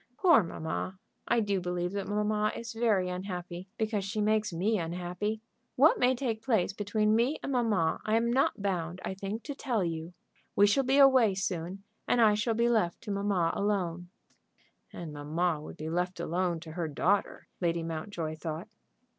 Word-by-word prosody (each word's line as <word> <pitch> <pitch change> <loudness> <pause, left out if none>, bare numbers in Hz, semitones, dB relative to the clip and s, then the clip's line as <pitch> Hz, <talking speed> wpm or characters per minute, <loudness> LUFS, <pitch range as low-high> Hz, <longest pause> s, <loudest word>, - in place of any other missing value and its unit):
"Poor 345 - +6
mamma! 165 +2 -4 0.3
I 235 -1 +3
do 200 -3 0
believe 180 0 -2
that 200 -1 -3
mamma 210 +1 +1
is 230 -1 -6
very 220 -5 +2
unhappy, 180 -1 -5
because 215 -2 -1
she 200 +2 -3
makes 215 0 +2
me 195 +6 +1
unhappy. 180 +6 -3 0.3
What 290 +5 +5
may 250 +1 +4
take 235 -4 -2
place 220 -6 +1
between 210 +1 +1
me 245 +7 +2
and - - -3
mamma 220 -10 +1
I 215 - +1
am 235 +1 +2
not 260 -6 +1
bound, 175 -3 -2
I - - -2
think, 200 +4 -5
to 285 - -5
tell 240 -7 -1
you. 165 +1 -4 0.4
We 205 - +6
shall 205 +7 +3
be 265 +2 +3
away 260 -7 +6
soon, 185 0 -3 0.2
and 245 - +2
I 220 -2 +6
shall 215 +2 0
be 235 +1 +2
left 215 -8 +1
to 215 - -5
mamma 200 -4 +1
alone." 180 -4 -1 0.8
And 165 -3 -7
mamma 155 +2 -1
would - - -9
be 155 - -5
left 180 +2 -1
alone 175 0 -1
to 160 -1 -9
her 165 0 -3
daughter, 185 +7 0
Lady 170 -2 0
Mountjoy 160 -1 -4
thought. 160 +5 -5
195 Hz, 180 wpm, -30 LUFS, 175-220 Hz, 0.8 s, Poor